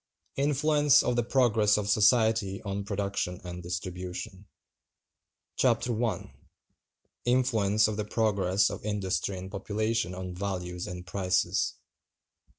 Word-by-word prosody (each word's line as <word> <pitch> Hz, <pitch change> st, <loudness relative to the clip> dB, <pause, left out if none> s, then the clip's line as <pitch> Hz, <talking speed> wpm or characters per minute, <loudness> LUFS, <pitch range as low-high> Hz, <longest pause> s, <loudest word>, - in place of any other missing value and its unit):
INFLUENCE 145 Hz, +1 st, +3 dB
OF 125 Hz, -, 0 dB
THE 120 Hz, -, +3 dB
PROGRESS 115 Hz, -4 st, +3 dB
OF 105 Hz, -1 st, -2 dB
SOCIETY 110 Hz, -2 st, +3 dB
ON 100 Hz, -1 st, -3 dB
PRODUCTION 100 Hz, -3 st, -2 dB
AND 90 Hz, 0 st, -7 dB
DISTRIBUTION. 90 Hz, +3 st, -6 dB, 1.1 s
Chapter 120 Hz, -2 st, +1 dB
I. 110 Hz, -7 st, -3 dB, 0.9 s
Influence 110 Hz, -5 st, +3 dB
Of 110 Hz, -1 st, -3 dB
The 105 Hz, -, -2 dB
Progress 100 Hz, -3 st, +1 dB
Of -, -, -7 dB
Industry 100 Hz, -2 st, -2 dB
And 95 Hz, +1 st, -8 dB
Population 105 Hz, 0 st, -1 dB
On 90 Hz, -1 st, -6 dB
Values 90 Hz, -2 st, -4 dB
And 90 Hz, 0 st, -7 dB
Prices. 95 Hz, -1 st, 0 dB
100 Hz, 115 wpm, -28 LUFS, 95-115 Hz, 1.1 s, INFLUENCE